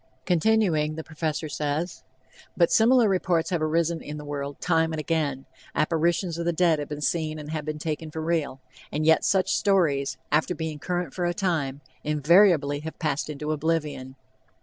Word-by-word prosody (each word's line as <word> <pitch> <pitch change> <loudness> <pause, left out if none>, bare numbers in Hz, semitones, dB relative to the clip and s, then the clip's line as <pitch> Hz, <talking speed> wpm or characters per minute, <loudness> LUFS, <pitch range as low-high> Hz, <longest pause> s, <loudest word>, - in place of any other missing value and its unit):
Continuing, 175 -5 +2
the 160 - -5
Professor 155 0 -3
says: 150 +3 -3 0.6
"But 170 -2 +4
similar 235 +1 +5
reports 180 -3 +1
have 175 -3 0
arisen 165 +1 0
in 150 +1 -7
the 150 - -8
world 140 -1 -5
time 165 -2 +1
and 155 - -3
again, 150 -4 -1 0.3
apparitions 170 +2 +1
of 170 - -2
the 170 - +2
dead 165 -2 +2
have 145 - -5
been 150 0 -5
seen 155 0 -1
and 150 0 -7
have 155 -2 -3
been 155 -1 -3
taken 155 0 -4
for 160 - -6
real; 160 -4 -1 0.3
and 155 +1 -1
yet 160 0 +5
such 190 -2 +2
stories, 145 -9 +1
after 155 +4 +2
being 160 -1 -4
current 175 -2 -3
for 180 - -2
a 175 0 -1
time, 150 -8 -1 0.2
invariably 150 -1 +4
have 160 +2 -7
passed 150 -2 -2
into 150 +1 -4
oblivion. 150 -4 -2
160 Hz, 175 wpm, -26 LUFS, 150-170 Hz, 0.6 s, similar